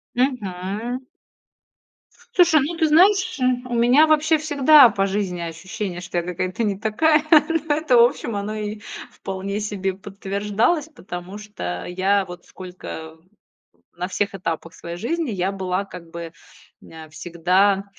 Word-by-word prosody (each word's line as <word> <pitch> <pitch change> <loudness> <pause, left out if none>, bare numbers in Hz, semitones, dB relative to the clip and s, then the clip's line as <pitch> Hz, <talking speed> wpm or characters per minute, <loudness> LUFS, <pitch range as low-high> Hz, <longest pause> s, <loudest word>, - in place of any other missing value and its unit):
Мгм. 230 -1 -2 1.4
Слушай, 345 -4 +6
ну 330 +4 -4
ты 320 -2 +3
знаешь, 365 +2 +4
э, 255 - -1 0.3
у 245 - -4
меня 245 +6 +5
вообще 310 +1 +3
всегда 295 -3 +6
по 195 -2 0
жизни 190 -3 -2
ощущение, 175 +3 -5
что 175 -1 -5
я 170 - -3
какая-то 185 +4 -3
не 205 -3 0
такая. 300 +10 +2
Но 310 0 +4
это, 305 -5 +2
в 235 - +8
общем, 235 -2 0
оно 205 +1 -3
и 210 0 -4 0.3
вполне 195 +1 -5
себе 200 -3 -2
подтверждалось, 205 - -1
потому 185 - -8
что 90 - -6
я 190 +2 +1
вот 175 -1 -11
сколько 180 -3 -9
в 165 +3 -29 0.7
на 180 - -2
всех 200 +2 -2
этапах 165 -3 -4
своей 170 0 -7
жизни 295 - -2
я 190 -1 -1
была 190 0 -2
как 175 -4 -11
бы 170 -1 -7 0.5
нэ 160 -1 -12
всегда, 180 +5 +1
200 Hz, 145 wpm, -22 LUFS, 180-260 Hz, 1.4 s, в